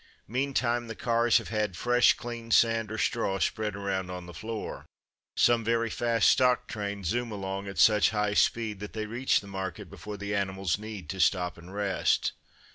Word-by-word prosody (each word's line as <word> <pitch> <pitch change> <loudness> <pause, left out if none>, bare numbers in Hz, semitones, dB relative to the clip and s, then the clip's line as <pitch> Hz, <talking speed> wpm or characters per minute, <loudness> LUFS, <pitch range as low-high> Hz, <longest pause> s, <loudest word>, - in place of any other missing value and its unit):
Meantime 120 -1 0
the 115 - -6
cars 115 0 +3
have - - -4
had 105 -5 -1
fresh 120 0 +4
clean 120 -1 -7
sand 115 -1 +3
or 110 - -4
straw 100 -1 0
spread 105 +2 -1
around 95 -2 -2
on 90 -1 -6
the 90 - -10
floor. 110 +6 -6 0.5
Some 120 -1 +4
very 115 0 0
fast 115 -2 +2
stock 125 -2 +3
trains 100 -2 -4
zoom 120 +1 -1
along 100 -1 -4
at 100 - -7
such 105 -2 +5
high 105 -1 0
speed 110 -1 +1
that 105 +1 -7
they 110 -1 -3
reach 120 +5 +1
the - - -13
market 95 -1 -6
before 105 -1 -8
the 100 +1 -4
animals 95 -2 -1
need 105 -6 -8
to 95 - -7
stop 90 -2 +2
and 85 +2 -13
rest. 100 -1 +1
105 Hz, 185 wpm, -28 LUFS, 95-115 Hz, 0.5 s, such